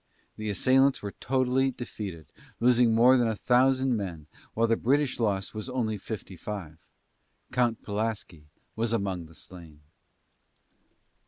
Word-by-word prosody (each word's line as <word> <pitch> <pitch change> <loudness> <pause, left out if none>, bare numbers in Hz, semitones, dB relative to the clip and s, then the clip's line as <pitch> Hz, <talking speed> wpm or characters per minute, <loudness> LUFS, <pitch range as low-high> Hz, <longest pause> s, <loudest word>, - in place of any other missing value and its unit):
The 110 0 -4
assailants 130 +7 +3
were 100 - -4
totally 130 +1 +1
defeated, 100 - -7 0.3
losing 120 -1 +4
more 125 +3 +6
than 120 -2 +2
a 110 - -1
thousand 130 +2 +3
men, 90 -8 -5 0.3
while 115 - +3
the 115 0 +3
British 140 +3 +1
loss 100 -4 0
was 110 +4 -5
only 120 -4 -1
fifty 100 -1 -7
five. 85 -5 -7 0.7
Count 120 -2 +1
Pulaski 105 -7 -4 0.3
was 115 +1 0
among 95 -6 -2
the 80 - -17
slain. 80 -2 -12
110 Hz, 135 wpm, -28 LUFS, 100-125 Hz, 0.7 s, more